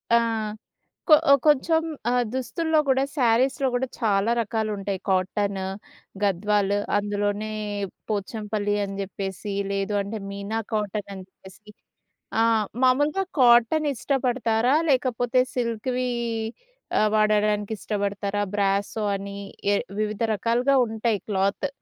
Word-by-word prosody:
ఆ! -, -, +7 dB, 0.9 s
కొ 310 Hz, -, +9 dB, 0.3 s
కొంచెం 320 Hz, +3 st, +4 dB, 0.3 s
ఆహ్, 245 Hz, -1 st, +2 dB
దుస్తుల్లో 315 Hz, +5 st, 0 dB
కూడా 265 Hz, 0 st, +3 dB
శారీస్‌లో 260 Hz, +2 st, +2 dB
కూడా 255 Hz, +2 st, 0 dB
చాలా 210 Hz, -2 st, +2 dB
రకాలుంటాయి 210 Hz, -3 st, -2 dB
'కాటను,' 190 Hz, +1 st, 0 dB, 0.6 s
'గద్వాలు.' 205 Hz, +1 st, +1 dB, 0.2 s
అందులోనే 205 Hz, +1 st, -2 dB, 0.6 s
'పోచంపల్లి' 205 Hz, 0 st, -2 dB
అని 195 Hz, 0 st, -6 dB
జెప్పేసి 195 Hz, +1 st, -5 dB, 0.2 s
లేదు 195 Hz, +1 st, -1 dB
అంటే 210 Hz, +2 st, -5 dB
'మీనా 200 Hz, +3 st, -4 dB
కాటనని' 200 Hz, -2 st, -3 dB
జెప్పేసి. 195 Hz, +3 st, -16 dB, 0.7 s
ఆ -, -, +5 dB, 0.4 s
మామూలుగా 290 Hz, +9 st, +3 dB, 0.2 s
కాటన్ 240 Hz, +6 st, +5 dB
ఇష్టపడతారా? 245 Hz, -1 st, +1 dB, 0.2 s
లేకపోతే 250 Hz, -1 st, +2 dB
సిల్క్‌వి 250 Hz, +1 st, -1 dB, 0.9 s
ఆహ్, 215 Hz, -, +4 dB
వాడడానికి 210 Hz, 0 st, +2 dB
ఇష్టపడతారా? 205 Hz, -1 st, -2 dB
'బ్రాసో' 200 Hz, +1 st, 0 dB
అని 200 Hz, 0 st, -7 dB, 0.4 s
ఏ -, -, +3 dB, 0.2 s
వివిధ 215 Hz, 0 st, -2 dB
రకాలుగా 245 Hz, +6 st, +2 dB
ఉంటాయి 220 Hz, -2 st, -1 dB
క్లాత్. 200 Hz, +7 st, 0 dB
215 Hz, 100 wpm, -25 LUFS, 200-245 Hz, 0.9 s, కొ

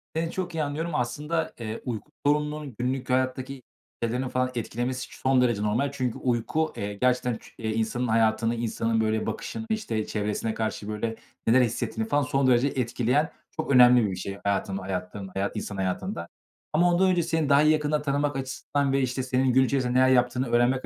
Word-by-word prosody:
Seni 165 Hz, +1 st, -1 dB
çok 180 Hz, -2 st, -4 dB
iyi 160 Hz, -, 0 dB
anlıyorum. 150 Hz, +3 st, -3 dB
Aslında, 150 Hz, +6 st, -1 dB
eee, 110 Hz, -1 st, -5 dB
uyku 120 Hz, +3 st, -5 dB
sorununun 150 Hz, -2 st, 0 dB
günlük 130 Hz, +1 st, -2 dB
hayattaki 130 Hz, +1 st, -1 dB, 0.4 s
şeylerini 125 Hz, +3 st, -1 dB
falan 125 Hz, 0 st, 0 dB
etkilemesi 120 Hz, +2 st, -3 dB
son 130 Hz, -1 st, +3 dB
derece 120 Hz, -5 st, +2 dB
normal 120 Hz, +7 st, +1 dB
çünkü 130 Hz, -4 st, -2 dB
uyku, 130 Hz, +6 st, 0 dB
eee, 100 Hz, 0 st, -3 dB
gerçekten 125 Hz, +2 st, +1 dB
çu -, -, -16 dB
insanın 110 Hz, +3 st, -1 dB
hayatını, 115 Hz, +1 st, +2 dB
insanın 115 Hz, -1 st, 0 dB
böyle 110 Hz, 0 st, 0 dB
bakışını, 225 Hz, -, -4 dB
işte, 120 Hz, -, -1 dB
çevresine 105 Hz, +1 st, -2 dB
karşı 110 Hz, -2 st, -3 dB
böyle 110 Hz, +1 st, -2 dB, 0.3 s
neler 125 Hz, +3 st, +6 dB
hissettiğini 110 Hz, -1 st, -1 dB
falan 145 Hz, 0 st, +3 dB
son 135 Hz, 0 st, +1 dB
derece 125 Hz, +1 st, +4 dB
etkileyen 130 Hz, +2 st, 0 dB, 0.2 s
çok 155 Hz, -2 st, -3 dB
önemli 125 Hz, -2 st, +7 dB
bir 100 Hz, -, -1 dB
bir -, -, -3 dB
şey 100 Hz, +2 st, -5 dB
hayatın 100 Hz, -1 st, 0 dB
hayatın 95 Hz, +1 st, -5 dB
hayat 100 Hz, +2 st, -2 dB
insan 105 Hz, -1 st, -4 dB
hayatında 95 Hz, -1 st, -2 dB, 0.5 s
ama 175 Hz, +3 st, +4 dB
ondan 190 Hz, +2 st, +4 dB
önce 175 Hz, -2 st, +2 dB
seni 160 Hz, -2 st, 0 dB
daha 140 Hz, +1 st, +6 dB
yakından 150 Hz, -1 st, +2 dB
tanımak 145 Hz, 0 st, 0 dB
açısından 135 Hz, +1 st, -1 dB
ve, 135 Hz, -, +3 dB
işte, 130 Hz, 0 st, -1 dB
senin 130 Hz, 0 st, +1 dB
gün 130 Hz, +1 st, +5 dB
içinde 130 Hz, -2 st, 0 dB
neler 130 Hz, +1 st, +5 dB
yaptığını 125 Hz, 0 st, +2 dB
öğrenmek 120 Hz, +2 st, +2 dB
125 Hz, 180 wpm, -26 LUFS, 115-140 Hz, 0.5 s, önemli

